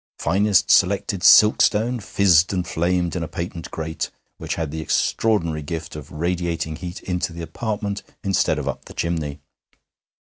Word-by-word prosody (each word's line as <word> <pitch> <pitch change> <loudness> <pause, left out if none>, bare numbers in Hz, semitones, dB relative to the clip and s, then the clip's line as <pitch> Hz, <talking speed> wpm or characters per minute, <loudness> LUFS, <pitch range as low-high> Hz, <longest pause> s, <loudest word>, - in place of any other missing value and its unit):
Finest 100 +5 +2
selected 95 0 +3
silkstone 110 +4 +5
fizzed 95 -4 +3
and 90 -2 -1
flamed 85 0 0
in 90 - -2
a 80 - -3
patent 85 -1 -6
grate 80 0 -4 0.3
which - - -3
had 80 -3 -3
the 80 +1 -4
extraordinary 85 -1 0
gift 80 +2 -6
of 75 -1 -9
radiating 85 0 -2
heat 90 +2 -8
into 90 -1 -2
the 85 0 -7
apartment 105 +2 -3 0.2
instead 95 -2 +1
of - - -4
up - - -4
the - - -12
chimney. 75 -4 -3
85 Hz, 150 wpm, -22 LUFS, 80-100 Hz, 0.3 s, silkstone